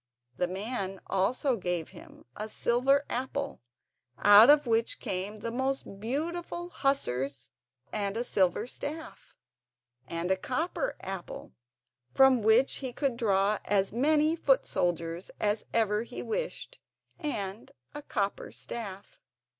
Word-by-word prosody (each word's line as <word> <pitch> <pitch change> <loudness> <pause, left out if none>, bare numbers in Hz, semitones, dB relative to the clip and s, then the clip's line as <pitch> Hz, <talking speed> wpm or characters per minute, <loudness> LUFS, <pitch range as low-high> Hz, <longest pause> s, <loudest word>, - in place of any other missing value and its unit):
The 180 - 0
old 180 - -6
man 195 -2 -3
also 240 +7 +1
gave 175 -4 -2
him - - -14
a 215 +1 -5
silver 270 +6 +2
apple 265 +3 -3 0.6
out 205 +4 +8
of 295 0 +6
which 230 -1 +1
came 200 +3 -3
the 230 - -3
most 260 -5 -2
beautiful 340 +9 -3
hussars 140 - -1 0.4
and 200 0 -1
a 235 - 0
silver 190 -6 +1
staff; 315 - -7 0.7
and 170 +4 -2
a - - +5
copper 325 - -2
apple 190 -2 -7 0.6
from 265 -3 +6
which 220 +5 +4
he 260 -2 -4
could 270 -1 -1
draw 205 -3 +2
as 195 -1 +1
many 305 +5 +3
foot - - +3
soldiers 170 0 -1
as 210 +1 0
ever 215 -2 +2
he 235 - -7
wished, - - -4 0.4
and 210 - -4 0.2
a 295 - -6
copper 200 -8 -2
staff. 200 -4 -8
230 Hz, 130 wpm, -29 LUFS, 195-275 Hz, 0.7 s, out